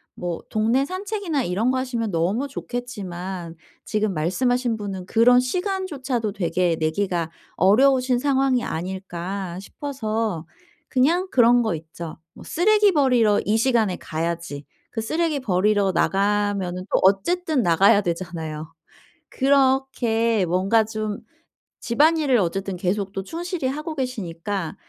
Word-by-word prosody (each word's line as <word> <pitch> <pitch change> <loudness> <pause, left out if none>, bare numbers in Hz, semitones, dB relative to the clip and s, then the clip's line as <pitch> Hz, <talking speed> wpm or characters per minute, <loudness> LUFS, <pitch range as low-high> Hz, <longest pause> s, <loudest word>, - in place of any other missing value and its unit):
뭐 175 -2 -4
동네 230 +6 +2
산책이나 375 - -2
이런 210 +8 0
거 260 - 0
하시면 235 -5 -2
너무 190 +12 0
좋겠지만 190 -10 -6 0.3
지금 215 -2 -1
말씀하신 235 +9 0
분은 195 -3 -6
'그런 245 +2 +5
시간조차도 270 - -2
되게 180 -3 0
내기가 165 0 -1 0.2
어려우신 250 +6 +4
상황이 270 -2 +2
아닐까?' 185 +1 -5
싶어서. 220 - -3 0.4
그냥 325 +8 +2
그런 240 -1 +5
거 220 -6 0
있죠. 160 +1 -8 0.2
뭐 - - -13
쓰레기 415 +4 +3
버리러 250 - +3
이 215 +2 +1
시간에 225 -6 +2
가야지. 165 -2 -4 0.3
그 225 - -3
쓰레기 315 +5 0
버리러 205 -3 +2
나가면은 200 -2 0
또 - - +5
어쨌든 295 - +2
나가야 195 +4 +5
되잖아요. 165 -4 -4 0.6
그렇게 260 -6 +2
뭔가 190 +6 +2
좀 215 -1 -4 0.6
집안일을 290 +1 +3
어쨌든 195 +1 -2
계속 195 +2 -1
또 195 - -3
충실히 340 - -4
하고 305 +4 -4
계시니까 200 - -4
215 Hz, 290 characters per minute, -23 LUFS, 185-265 Hz, 0.6 s, 그런